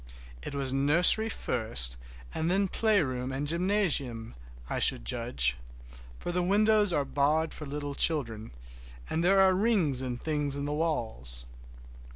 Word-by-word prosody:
It 140 - -7
was 135 -2 -2
nursery 170 +11 +5
first 110 - 0 0.4
and 160 +1 -2
then 195 +2 +1
playground 145 - 0
and 135 +2 -3
gymnasium, 160 - 0 0.3
I - - -3
should - - +2
judge; 60 +1 0 0.6
for 175 - -5
the 180 +1 -1
windows 210 +2 +3
are 145 -4 0
barred 150 +4 0
for 150 - -8
little 145 0 -5
children, 115 -9 +1 0.6
and 165 - -1
there 195 +2 +3
are 190 -1 +4
rings 185 - +1
and 125 -2 -5
things 150 -2 -2
in 140 0 -4
the 145 - -3
walls. 110 - -3
145 Hz, 145 wpm, -28 LUFS, 125-180 Hz, 0.6 s, nursery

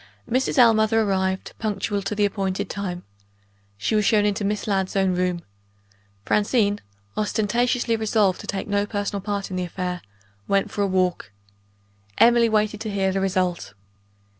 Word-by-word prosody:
Mrs. 260 +3 0
Ellmother 225 -2 +5
arrived, 190 -2 -1
punctual 205 -1 -2
to 195 +2 -3
the 205 0 +2
appointed 195 -2 -2
time. 185 -3 -4 0.7
She 100 - -1
was 210 -1 +3
shown 210 0 +3
into 205 0 0
Miss 205 +1 -1
Ladd's 195 -2 -1
own 190 -1 +2
room. 180 -1 -1 0.8
Francine 205 -1 +2 0.4
ostentatiously 230 +3 +1
resolved 215 -4 +1
to - - -11
take 195 - -3
no 205 0 0
personal 205 -1 -3
part 200 -1 -3
in 185 - -3
the 180 - -1
affair 180 0 -4 0.5
went 195 0 +1
for 205 - -2
a 200 - +2
walk. 185 - 0 0.9
Emily 235 0 +5
waited 215 -1 0
to 220 - -3
hear 195 -2 0
the 195 0 -1
result. 185 - -1
200 Hz, 155 wpm, -23 LUFS, 190-215 Hz, 0.9 s, Ellmother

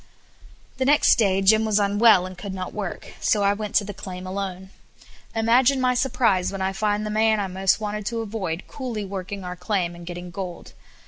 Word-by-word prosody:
The 260 - 0
next 290 -2 +5
day 195 -3 +2
Jim 220 +3 +5
was 215 -2 +1
unwell, 205 -1 +4
and 185 0 -8
could 190 +1 -6
not 185 -1 -5
work; 205 -4 -6
so 205 -2 +2
I 200 0 +4
went 210 0 -5
to 205 - +4
the 205 0 -6
claim 185 -2 -8
alone. 190 0 -5 0.6
Imagine 245 +4 +3
my 255 -1 +2
surprise 240 -7 +1
when 195 - -5
I 190 0 -1
found 210 +1 0
the 215 - -3
man 220 0 +3
I 200 - 0
wanted 195 +3 0
most 210 - -7
to 230 0 -2
avoid 200 -6 -4
coolly 240 -7 -5
working 195 0 -6
our 180 0 -5
claim, 180 -1 -1
and 170 0 -11
getting 175 0 -7
gold. 180 -1 -7
200 Hz, 200 wpm, -24 LUFS, 185-220 Hz, 0.6 s, next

